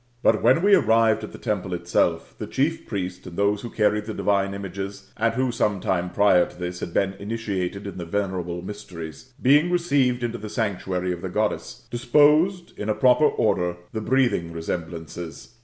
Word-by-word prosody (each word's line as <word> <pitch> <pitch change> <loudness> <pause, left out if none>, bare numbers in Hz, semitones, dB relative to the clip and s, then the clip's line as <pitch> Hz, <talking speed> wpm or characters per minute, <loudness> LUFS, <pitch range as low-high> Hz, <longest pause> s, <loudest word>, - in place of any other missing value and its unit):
But 110 - +4
when 130 +9 +4
we 205 0 +5
arrived 115 - +4
at - - -6
the - - -10
temple 100 -5 -2
itself, 85 -1 0
the - - -4
chief 155 +5 -1
priest 95 -3 -4
and 85 - -9
those 100 0 +2
who 120 - -6
carried 105 -1 +1
the 110 -1 -5
divine 100 -1 +1
images, 100 0 -7
and 115 +1 +1
who, 130 0 +1
some 105 -4 0
time 90 0 -1
prior 90 -2 +4
to - - -15
this, 90 0 -4
had - - -5
been 95 +2 +1
initiated 100 -2 -3
in 100 -2 -6
the 85 - -4
venerable 90 -2 -2
mysteries, 95 - -8
being 145 +6 +4
re 180 - +3
ceived 135 -8 +1
into 120 0 -2
the 105 - -7
sanctuary 95 -5 -2
of 85 - -7
the - - -4
Goddess, - - -2
disposed 150 +9 +3
in 105 - -3
a 105 - +2
proper 125 +6 +5
order 90 -8 0 0.2
the 110 - -2
breathing 115 -9 +1
resemblances. 80 +3 -6
100 Hz, 190 wpm, -24 LUFS, 90-120 Hz, 0.2 s, we